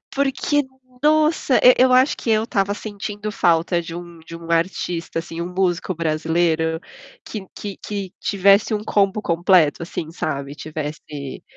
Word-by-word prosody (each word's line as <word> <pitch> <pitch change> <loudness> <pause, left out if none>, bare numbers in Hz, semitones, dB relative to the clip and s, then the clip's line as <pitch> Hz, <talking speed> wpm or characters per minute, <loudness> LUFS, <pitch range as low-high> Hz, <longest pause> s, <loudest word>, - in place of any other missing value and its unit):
porque, 280 +1 +1 0.4
nossa, 305 -3 +3
e 250 - +8
eu 255 0 +5
acho 255 +3 +4
que 230 - -3
eu 220 0 +3
estava 200 -2 0
sentindo 210 0 -6
falta 170 -1 +2
de 165 0 -8
um 170 -1 -9
de 165 +1 -10
um 165 0 -10
artista 170 0 -1
assim, 165 0 -5
músico 180 0 -1
brasileiro, 160 0 0 0.4
que 205 -4 -7
que 200 -2 -6
que 200 -3 -5
tivesse 200 +2 +3
um 210 - -2
combo 200 0 +1
completo 170 -3 +3
assim, 160 -1 -5
sabe, 140 -4 -4
tivesse 150 -2 -6
180 Hz, 145 wpm, -21 LUFS, 165-210 Hz, 0.4 s, e